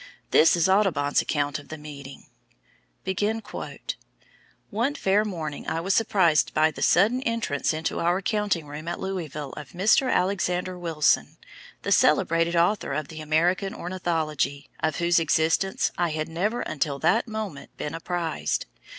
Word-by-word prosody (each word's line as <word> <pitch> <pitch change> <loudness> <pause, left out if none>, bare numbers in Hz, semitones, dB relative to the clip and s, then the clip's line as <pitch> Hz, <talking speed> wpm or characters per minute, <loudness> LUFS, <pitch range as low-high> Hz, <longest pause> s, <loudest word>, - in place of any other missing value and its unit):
This 160 - +6
is 170 +1 +2
Audubon's 185 -8 +2
account 145 -2 -1
of 145 - -14
the 160 - -7
meeting: 140 -2 -10 2.5
"One 240 +8 0
fair 205 -5 +2
morning 160 -8 -5
I 160 - -1
was 190 +4 0
surprised 185 -8 +3
by 155 +1 +4
the - - -9
sudden 220 +8 +4
entrance 230 - -1
into 155 0 -2
our 175 +2 +2
counting 200 -4 -1
room 150 +2 -8
at 175 - -3
Louisville 155 -7 -4
of 150 -3 -9
Mr. 215 +8 +3
Alexander 180 -1 0
Wilson, 165 -4 +1 0.5
the - - -2
celebrated 165 +1 +3
author 175 0 +2
of 150 0 -3
the 160 -1 -8
American 175 +7 +1
Ornithology, 160 -5 -2
of 155 -1 0
whose 170 0 +3
existence 165 +4 +1
I 175 -1 +2
had 155 0 -2
never 200 +9 -1
until 145 -1 -2
that 225 - +2
moment 215 -9 -6
been 150 - -4
apprised. 165 -1 -2
170 Hz, 140 wpm, -25 LUFS, 155-190 Hz, 2.5 s, This